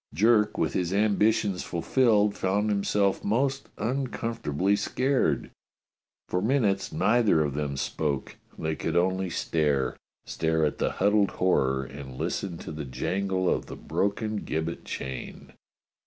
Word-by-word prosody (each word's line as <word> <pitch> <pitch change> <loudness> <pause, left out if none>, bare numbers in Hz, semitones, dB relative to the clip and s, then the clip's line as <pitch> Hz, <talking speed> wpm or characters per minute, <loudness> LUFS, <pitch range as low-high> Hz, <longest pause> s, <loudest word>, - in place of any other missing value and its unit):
Jerk, 105 +3 +3
with 80 - 0
his 90 -1 0
ambitions 105 -1 +2
fulfilled, 105 +3 +2
found 100 +3 0
himself 100 -1 +1
most 135 +6 0
uncomfortably 115 - -1
scared. 130 +5 0 0.8
For 90 - -1
minutes 105 -4 +1
neither 105 -5 +3
of 70 -2 -2
them 70 -1 -2
spoke. 70 0 -2 0.2
They 80 0 -2
could 80 +2 -1
only 95 +1 +1
stare. 75 -5 0 0.3
Stare 80 -1 0
at 75 - -2
the - - 0
huddled 105 0 +3
horror 65 -7 +1
and 65 -1 -9
listen 90 +4 -2
to - - -5
the 75 -1 -5
jangle 95 +8 -1
of - - 0
the - - -7
broken 105 +2 -1
gibbet 80 -3 -3
chain. 65 -1 -6
95 Hz, 130 wpm, -27 LUFS, 80-105 Hz, 0.8 s, Jerk